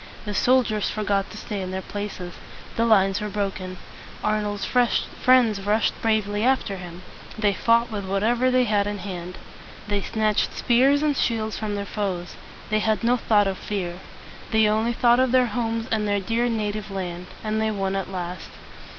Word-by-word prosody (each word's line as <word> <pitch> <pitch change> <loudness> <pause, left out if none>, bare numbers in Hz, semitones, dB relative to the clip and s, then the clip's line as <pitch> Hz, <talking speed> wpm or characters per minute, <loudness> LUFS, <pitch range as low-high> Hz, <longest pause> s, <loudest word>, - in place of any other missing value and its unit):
The 210 - -3
soldiers 225 -2 +2
forgot 200 -2 -1
to 215 - -10
stay 210 -2 -4
in 185 - -4
their 190 0 -4
places. 205 -4 -6 0.4
The 230 0 +2
lines 195 -2 +4
were 210 - -3
broken. 195 -2 -3 0.5
Arnold's 210 -1 -1
friends 245 -2 +2
rushed 210 +3 +1
bravely 215 -2 +1
after 250 -6 +1
him. 180 0 -9 0.3
They 210 -2 +2
fought 230 +4 +2
with 205 -2 -4
whatever 225 +6 +1
they 255 0 +3
had 205 -3 +1
in 205 0 -3
hand. 180 -2 -6 0.5
They 205 -1 0
snatched 215 0 0
spears 270 +4 +3
and 295 -2 +2
shields 220 -4 -1
from 210 -2 -2
their 200 0 -3
foes. 190 -4 -3 0.4
They 215 - +3
had 215 +1 0
no 240 +2 +4
thought 215 -4 +3
of 195 -1 -2
fear. 180 -4 -4 0.5
They 220 -1 +4
only 220 +3 +1
thought 240 +1 +4
of 260 -1 +3
their 255 -1 +5
homes 230 0 -1
and 215 -2 +1
their 205 0 +1
dear 230 +5 0
native 215 -2 -2
land. 180 -2 -5 0.2
And 215 0 -1
they 220 - +1
won 195 -2 -1
at 195 -1 -3
last. 180 -1 -5
210 Hz, 175 wpm, -24 LUFS, 195-230 Hz, 0.5 s, their